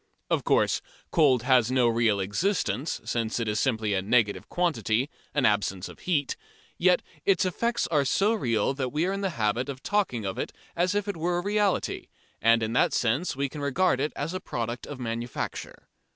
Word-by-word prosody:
Of -, -, +2 dB
course, -, -, +2 dB, 0.3 s
cold 140 Hz, -8 st, +4 dB
has 125 Hz, -3 st, +4 dB
no 130 Hz, -2 st, +3 dB
real 115 Hz, -3 st, +2 dB
existence, 150 Hz, -, -1 dB
since 115 Hz, -1 st, -1 dB
it 115 Hz, -, -2 dB
is 105 Hz, 0 st, 0 dB
simply 110 Hz, -5 st, 0 dB
a 95 Hz, -, +1 dB
negative 105 Hz, +1 st, +1 dB
quantity, 135 Hz, -, 0 dB, 0.2 s
an 145 Hz, -, +3 dB
absence 100 Hz, -3 st, +1 dB
of -, -, -12 dB
heat, 150 Hz, -6 st, 0 dB, 0.4 s
yet -, -, +4 dB, 0.2 s
its 395 Hz, -, +3 dB
effects 235 Hz, +6 st, 0 dB
are 150 Hz, -3 st, +3 dB
so 195 Hz, +11 st, +2 dB
real 120 Hz, -, +1 dB
that 130 Hz, -2 st, -2 dB
we 155 Hz, +4 st, 0 dB
are 190 Hz, -, 0 dB
in 195 Hz, -, -3 dB
the 195 Hz, -, 0 dB
habit 115 Hz, +5 st, 0 dB
of 135 Hz, -1 st, -7 dB
talking 190 Hz, -, 0 dB
of 95 Hz, -, -3 dB
it -, -, -3 dB, 0.2 s
as 180 Hz, +3 st, +1 dB
if 205 Hz, 0 st, 0 dB
it 200 Hz, -, -3 dB
were 175 Hz, +2 st, 0 dB
a 175 Hz, -, -2 dB
reality, 205 Hz, -1 st, 0 dB, 0.3 s
and 115 Hz, 0 st, +4 dB
in 110 Hz, +1 st, -2 dB
that 125 Hz, -, +3 dB
sense 125 Hz, +9 st, 0 dB
we 140 Hz, +1 st, 0 dB
can 145 Hz, +2 st, -8 dB
regard 140 Hz, +1 st, +2 dB
it 150 Hz, +3 st, 0 dB
as 150 Hz, +5 st, -3 dB
a 185 Hz, -, -2 dB
product 120 Hz, -7 st, -4 dB
of 145 Hz, -3 st, -7 dB
manufacture. 115 Hz, 0 st, -5 dB
130 Hz, 195 wpm, -27 LUFS, 115-175 Hz, 0.4 s, cold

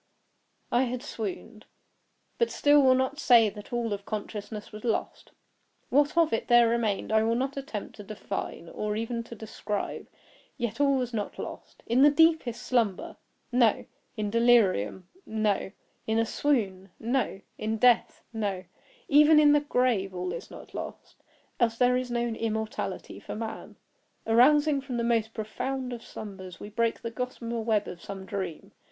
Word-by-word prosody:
I 245 Hz, +2 st, +3 dB
had 250 Hz, +1 st, -4 dB
swooned; 220 Hz, -3 st, -6 dB, 0.7 s
but 470 Hz, -, +3 dB
still 290 Hz, 0 st, +4 dB
will 260 Hz, -1 st, +5 dB
not 260 Hz, +3 st, -1 dB
say 230 Hz, -6 st, +6 dB
that 210 Hz, 0 st, -11 dB
all 235 Hz, -3 st, -1 dB
of 200 Hz, 0 st, -5 dB
consciousness 210 Hz, 0 st, -6 dB
was 215 Hz, 0 st, -9 dB
lost. 230 Hz, -3 st, -2 dB, 0.6 s
What 290 Hz, +4 st, +2 dB
of 330 Hz, -2 st, +4 dB
it 225 Hz, -, -1 dB
there 240 Hz, -1 st, +6 dB
remained 225 Hz, -4 st, 0 dB
I 220 Hz, 0 st, +4 dB
will 225 Hz, +1 st, +1 dB
not 265 Hz, +3 st, -1 dB
attempt 265 Hz, -8 st, -6 dB
to 205 Hz, -, -8 dB
define, 200 Hz, -4 st, -5 dB
or 210 Hz, 0 st, -3 dB
even 230 Hz, +2 st, -2 dB
to 235 Hz, -, -9 dB
describe; 210 Hz, -1 st, -4 dB, 0.5 s
yet 235 Hz, 0 st, -2 dB
all 280 Hz, -1 st, +4 dB
was 250 Hz, -2 st, -2 dB
not 210 Hz, -2 st, -3 dB
lost. -, -, -8 dB
In 240 Hz, +3 st, +2 dB
the 290 Hz, -, +8 dB
deepest 315 Hz, -5 st, +3 dB
slumber—no! 235 Hz, +1 st, 0 dB, 0.3 s
In 210 Hz, -1 st, -2 dB
delirium—no! 215 Hz, -, +1 dB, 0.4 s
In 220 Hz, 0 st, +1 dB
a 230 Hz, -, +3 dB
swoon—no! 220 Hz, -2 st, -1 dB, 0.2 s
In 220 Hz, +1 st, -1 dB
death—no! 220 Hz, -4 st, +1 dB, 0.4 s
even 300 Hz, +1 st, +7 dB
in 295 Hz, -1 st, +6 dB
the 295 Hz, -, +5 dB
grave 245 Hz, -9 st, 0 dB
all 180 Hz, 0 st, -3 dB
is 170 Hz, -, -7 dB
not -, -, -12 dB
lost. -, -, -8 dB, 0.4 s
Else 230 Hz, -2 st, +2 dB
there 250 Hz, 0 st, +4 dB
is 250 Hz, 0 st, -1 dB
no 240 Hz, 0 st, 0 dB
immortality 225 Hz, -2 st, -3 dB
for -, -, -7 dB
man. 220 Hz, 0 st, -6 dB, 0.5 s
Arousing 285 Hz, +5 st, +4 dB
from 260 Hz, -3 st, -5 dB
the 235 Hz, -, 0 dB
most 225 Hz, -1 st, 0 dB
profound 255 Hz, +4 st, -3 dB
of 235 Hz, -, -7 dB
slumbers, 190 Hz, -4 st, -9 dB
we 205 Hz, -, -8 dB
break 230 Hz, +2 st, -1 dB
the 230 Hz, -, -3 dB
gossamer 235 Hz, -1 st, -4 dB
web 215 Hz, -2 st, +1 dB
of 175 Hz, -, -8 dB
some 195 Hz, -1 st, -7 dB
dream. 190 Hz, -6 st, -5 dB
230 Hz, 155 wpm, -28 LUFS, 210-255 Hz, 0.7 s, the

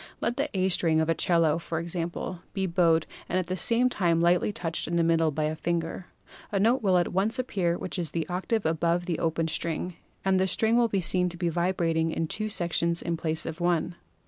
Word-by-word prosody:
Let 235 Hz, -, -1 dB
the 285 Hz, +3 st, -1 dB
A 185 Hz, 0 st, +2 dB
string 165 Hz, -3 st, +2 dB
of 160 Hz, 0 st, 0 dB
a -, -, +4 dB
'cello, 165 Hz, -2 st, +2 dB
for 165 Hz, -1 st, -4 dB
example, 170 Hz, +1 st, -4 dB
be 195 Hz, -2 st, -1 dB
bowed 170 Hz, -3 st, +2 dB, 0.2 s
and 180 Hz, -, 0 dB
at 185 Hz, -, 0 dB
the 185 Hz, +2 st, -3 dB
same 230 Hz, +7 st, +2 dB
time 175 Hz, -8 st, +1 dB
lightly 175 Hz, +4 st, +3 dB
touched 170 Hz, -6 st, -3 dB
in 170 Hz, -, -2 dB
the 170 Hz, -, +3 dB
middle 165 Hz, -1 st, +3 dB
by 155 Hz, +1 st, -2 dB
a 155 Hz, +1 st, -1 dB
finger. 170 Hz, +2 st, -3 dB, 0.4 s
A 200 Hz, -, 0 dB
note 230 Hz, +6 st, +3 dB
will 190 Hz, -4 st, +3 dB
at 175 Hz, -, 0 dB
once 205 Hz, +6 st, +2 dB
appear 185 Hz, -9 st, -1 dB
which 185 Hz, -, -4 dB
is 170 Hz, -3 st, -1 dB
the 165 Hz, -1 st, -3 dB
octave 190 Hz, +5 st, -2 dB
above 170 Hz, +2 st, +1 dB
the 175 Hz, -3 st, -2 dB
open 165 Hz, 0 st, 0 dB
string, 170 Hz, +2 st, -3 dB, 0.3 s
and 190 Hz, -1 st, +3 dB
the 190 Hz, -, +2 dB
string 220 Hz, +4 st, +2 dB
will 240 Hz, -1 st, +4 dB
be 200 Hz, -3 st, -1 dB
seen 180 Hz, +1 st, +2 dB
to 175 Hz, -, -7 dB
be 175 Hz, -1 st, 0 dB
vibrating 170 Hz, -1 st, 0 dB
in 165 Hz, 0 st, -1 dB
two 215 Hz, +6 st, -2 dB
sections 170 Hz, -3 st, +1 dB
in 170 Hz, -, -1 dB
place 160 Hz, -1 st, -1 dB
of 160 Hz, +2 st, -6 dB
one. 175 Hz, 0 st, +1 dB
175 Hz, 225 wpm, -27 LUFS, 165-190 Hz, 0.4 s, a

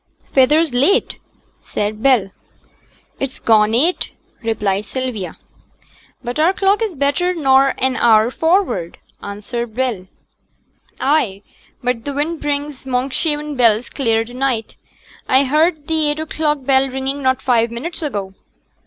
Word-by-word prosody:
'Feyther's 295 Hz, +3 st, +4 dB
late,' 285 Hz, -, +2 dB, 0.4 s
said 210 Hz, +1 st, -3 dB
Bell. 240 Hz, -8 st, +3 dB, 0.9 s
'It's 270 Hz, -1 st, -4 dB
gone 220 Hz, -1 st, +3 dB
eight,' 325 Hz, +9 st, +1 dB, 0.3 s
replied 210 Hz, -3 st, -1 dB
Sylvia. 250 Hz, -7 st, -4 dB, 0.9 s
'But 245 Hz, +3 st, -4 dB
our 335 Hz, +5 st, +4 dB
clock 395 Hz, +3 st, +2 dB
is 430 Hz, -6 st, -2 dB
better 290 Hz, +6 st, 0 dB
nor 270 Hz, -3 st, +3 dB
an 260 Hz, 0 st, 0 dB
hour 225 Hz, 0 st, +4 dB
forrard,' 320 Hz, -, 0 dB, 0.2 s
answered 215 Hz, +3 st, -5 dB
Bell. 240 Hz, -8 st, -2 dB, 0.9 s
'Ay, 245 Hz, -9 st, +1 dB, 0.4 s
but 245 Hz, -2 st, -1 dB
t' -, -, -4 dB
wind 300 Hz, +4 st, -2 dB
brings 290 Hz, -1 st, -2 dB
Monkshaven 285 Hz, +4 st, -1 dB
bells 230 Hz, -2 st, +2 dB
clear 225 Hz, -5 st, +1 dB
to 240 Hz, -, -12 dB
night. 250 Hz, -4 st, -2 dB, 0.5 s
I 260 Hz, +2 st, +5 dB
heerd 305 Hz, +2 st, +1 dB
t' 315 Hz, -2 st, +1 dB
eight 295 Hz, +1 st, -2 dB
o'clock 305 Hz, -2 st, -1 dB
bell 270 Hz, 0 st, +3 dB
ringing 265 Hz, +2 st, -3 dB
not 260 Hz, -1 st, +1 dB
five 235 Hz, -3 st, +2 dB
minutes 280 Hz, +11 st, -6 dB
ago.' 205 Hz, -11 st, -4 dB
265 Hz, 130 wpm, -18 LUFS, 230-295 Hz, 0.9 s, I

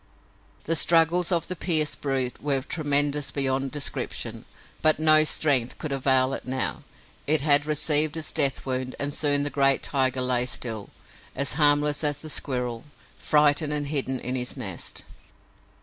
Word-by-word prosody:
The 165 Hz, -, 0 dB
struggles 165 Hz, +2 st, +3 dB
of 170 Hz, -2 st, -1 dB
the 185 Hz, -, -3 dB
pierced 155 Hz, -3 st, 0 dB
brute 135 Hz, -3 st, -2 dB
were 140 Hz, -3 st, -1 dB
tremendous 145 Hz, -2 st, +1 dB
beyond 135 Hz, -1 st, -1 dB
description, 145 Hz, +1 st, -4 dB, 0.4 s
but 155 Hz, 0 st, +5 dB
no 155 Hz, 0 st, +6 dB
strength 140 Hz, -5 st, 0 dB
could 155 Hz, -, -6 dB
avail 130 Hz, -1 st, +2 dB
it -, -, -6 dB
now; 130 Hz, 0 st, -2 dB, 0.5 s
it 155 Hz, 0 st, +3 dB
had 145 Hz, 0 st, +4 dB
received 150 Hz, 0 st, +1 dB
its 160 Hz, -, -3 dB
death 140 Hz, -4 st, +2 dB
wound 130 Hz, -1 st, -4 dB
and 145 Hz, 0 st, -2 dB
soon 145 Hz, -1 st, +1 dB
the 145 Hz, -, -3 dB
great 135 Hz, 0 st, +2 dB
tiger 130 Hz, -2 st, 0 dB
lay 125 Hz, -1 st, +1 dB
still, 115 Hz, -4 st, -4 dB, 0.5 s
as 140 Hz, +1 st, -1 dB
harmless 145 Hz, 0 st, +2 dB
as 145 Hz, 0 st, -1 dB
the 155 Hz, -, -7 dB
squirrel, 125 Hz, -5 st, -3 dB, 0.3 s
frightened 150 Hz, 0 st, +1 dB
and 145 Hz, -1 st, -3 dB
hidden 135 Hz, -3 st, -1 dB
in 125 Hz, -, -4 dB
his 125 Hz, +1 st, -3 dB
nest. 95 Hz, -9 st, -5 dB
145 Hz, 155 wpm, -24 LUFS, 130-150 Hz, 0.5 s, no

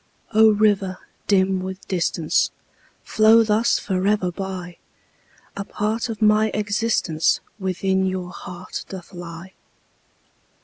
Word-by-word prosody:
O 220 Hz, +1 st, +7 dB
river, 205 Hz, -3 st, +2 dB, 0.3 s
dim 190 Hz, -1 st, +3 dB
with 190 Hz, 0 st, -7 dB
distance, 170 Hz, -3 st, +1 dB, 0.5 s
Flow 220 Hz, +1 st, +5 dB
thus 220 Hz, +2 st, +2 dB
forever 190 Hz, -1 st, 0 dB
by, 180 Hz, -1 st, -6 dB, 0.8 s
A 200 Hz, -, -4 dB
part 220 Hz, +4 st, -2 dB
of 220 Hz, -1 st, -3 dB
my 215 Hz, +1 st, +4 dB
existence 210 Hz, -6 st, +1 dB, 0.2 s
Within 190 Hz, 0 st, 0 dB
your 185 Hz, -1 st, -3 dB
heart 180 Hz, 0 st, -8 dB
doth 190 Hz, -1 st, -9 dB
lie! 175 Hz, +1 st, -9 dB
190 Hz, 105 wpm, -22 LUFS, 185-210 Hz, 0.8 s, O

